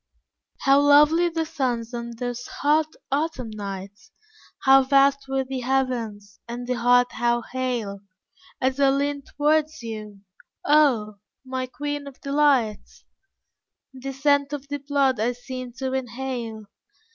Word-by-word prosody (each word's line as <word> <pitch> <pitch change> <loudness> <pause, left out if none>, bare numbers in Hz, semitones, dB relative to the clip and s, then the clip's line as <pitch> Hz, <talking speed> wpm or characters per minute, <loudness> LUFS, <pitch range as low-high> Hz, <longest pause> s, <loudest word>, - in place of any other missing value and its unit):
How 275 +1 +5
lovely 300 +4 +5
the 325 -1 -2
suns 245 -6 -2
on 235 0 -5
those 245 0 -4
hot, 300 +2 +1 0.2
autumn 275 -5 -1
nights! 200 0 -8 0.5
How 270 0 +7
vast 275 +1 +3
were 270 0 0
the 260 0 -4
heavens! 240 -6 -2
and 240 +1 -5
the 250 - -1
heart 245 0 +3
how 240 0 0
hale! 240 -6 -3 0.6
As 260 +1 0
I 275 -1 +5
leaned 280 +1 -1
towards 305 0 +1
you 215 -3 -7 0.4
oh, 250 -9 +3 0.3
my 260 0 -3
Queen 290 +3 -4
of 275 -1 -11
Delights, 275 -6 +1 0.9
The 265 +1 -6
scent 285 +1 +1
of 285 -1 -5
thy 285 0 -3
blood 275 -3 +1
I 235 +3 +1
seemed 250 0 -8
to 260 0 -3
inhale. 245 -3 -4
260 Hz, 135 wpm, -24 LUFS, 240-280 Hz, 0.9 s, How